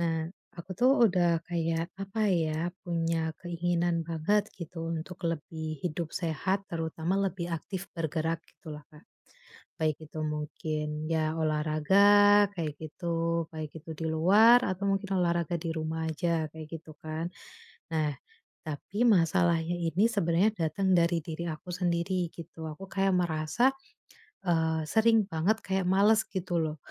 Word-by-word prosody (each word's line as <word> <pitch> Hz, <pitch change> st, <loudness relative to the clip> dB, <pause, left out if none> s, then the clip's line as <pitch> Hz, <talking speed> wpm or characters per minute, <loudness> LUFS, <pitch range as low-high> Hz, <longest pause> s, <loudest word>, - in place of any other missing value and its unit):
Nah, 165 Hz, -1 st, 0 dB, 0.3 s
aku 170 Hz, +3 st, -10 dB
tuh 250 Hz, +7 st, +4 dB, 0.2 s
udah 175 Hz, -3 st, +2 dB
kayak, 165 Hz, 0 st, -2 dB
apa 205 Hz, +2 st, -1 dB
ya, 165 Hz, 0 st, 0 dB
punya 165 Hz, -2 st, -1 dB
keinginan 175 Hz, -1 st, 0 dB
banget, 170 Hz, +6 st, 0 dB
gitu, 165 Hz, -1 st, -6 dB
untuk 170 Hz, +3 st, -5 dB
lebih 160 Hz, -1 st, -4 dB
hidup 165 Hz, -1 st, -2 dB
sehat, 185 Hz, +4 st, -1 dB
terutama 165 Hz, +3 st, -1 dB
lebih 180 Hz, -3 st, -2 dB
aktif 190 Hz, +3 st, -5 dB
bergerak 165 Hz, 0 st, -1 dB
gitu 160 Hz, -5 st, -11 dB
loh, 150 Hz, 0 st, -10 dB
Kak. 150 Hz, 0 st, -17 dB, 0.8 s
Baik 155 Hz, -2 st, +1 dB
itu 155 Hz, -, -8 dB
mungkin, 150 Hz, 0 st, -3 dB
ya 160 Hz, -1 st, +1 dB
olahraga, 190 Hz, +7 st, +5 dB
kayak 155 Hz, -4 st, -2 dB
gitu, 165 Hz, +1 st, -1 dB
baik 155 Hz, -1 st, -6 dB
itu 165 Hz, -, -11 dB
di 160 Hz, -, -3 dB
luar 210 Hz, +10 st, +6 dB
atau 185 Hz, +1 st, -2 dB
mungkin 195 Hz, -1 st, 0 dB
olahraga 170 Hz, -1 st, +1 dB
di 165 Hz, -, -4 dB
rumah 160 Hz, 0 st, -2 dB
aja, 160 Hz, 0 st, 0 dB
kayak 160 Hz, -1 st, -8 dB
gitu, 155 Hz, -1 st, -13 dB
kan. 160 Hz, +2 st, -3 dB, 0.6 s
Nah, 155 Hz, -2 st, 0 dB, 0.5 s
tapi 155 Hz, +7 st, -5 dB
masalahnya 170 Hz, -3 st, +3 dB
ini 175 Hz, +5 st, +2 dB
sebenarnya 190 Hz, +1 st, +2 dB
datang 185 Hz, +3 st, 0 dB
dari 170 Hz, 0 st, +3 dB
diri 170 Hz, +1 st, -5 dB
aku 155 Hz, +3 st, -8 dB
sendiri, 175 Hz, 0 st, 0 dB
gitu. 165 Hz, -1 st, -8 dB
Aku 155 Hz, +6 st, -9 dB
kayak 195 Hz, -1 st, +2 dB
merasa, 175 Hz, +9 st, +2 dB, 0.8 s
eee, 160 Hz, -2 st, +2 dB
sering 220 Hz, +3 st, +4 dB
banget 195 Hz, +5 st, +1 dB
kayak 190 Hz, -1 st, 0 dB
males, 205 Hz, +3 st, +5 dB
gitu 180 Hz, -2 st, -2 dB
loh. 155 Hz, -1 st, -2 dB
170 Hz, 140 wpm, -29 LUFS, 160-185 Hz, 0.8 s, luar